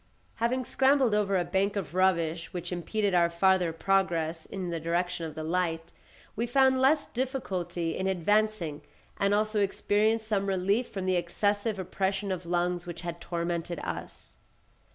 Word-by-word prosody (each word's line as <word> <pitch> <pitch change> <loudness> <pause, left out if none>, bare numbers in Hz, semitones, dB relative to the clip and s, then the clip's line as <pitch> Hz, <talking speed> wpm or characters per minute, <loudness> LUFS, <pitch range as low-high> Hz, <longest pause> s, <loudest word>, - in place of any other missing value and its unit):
Having 245 +3 0
scrambled 265 -3 +3
over 200 -2 +2
a 175 - 0
bank 200 +1 0
of 180 -6 -4
rubbish 170 -3 +1
which 175 0 -5
impeded 195 +4 -1
our 170 -1 +4
farther 180 0 +3
progress 165 -2 0
in 185 -3 -4
the 165 - -2
direction 170 +1 -1
of 155 - -9
the 155 - -4
light, 165 0 -1 0.4
we 235 +3 -1
found 265 +1 +4
less 290 +3 +4
difficulty 190 -10 -3
in 190 - -1
advancing 190 -4 +1 0.4
and 200 0 +2
also 215 +1 +1
experienced 215 +3 +1
some 200 -2 0
relief 195 +5 +1
from 190 -2 -4
the 185 -1 +2
excessive 205 +5 0
oppression 190 +2 -2
of 180 -2 -4
lungs 175 0 0
which 170 -1 -6
had 170 -1 -6
tormented 170 0 -3
us. - - -7
190 Hz, 155 wpm, -29 LUFS, 170-210 Hz, 0.4 s, our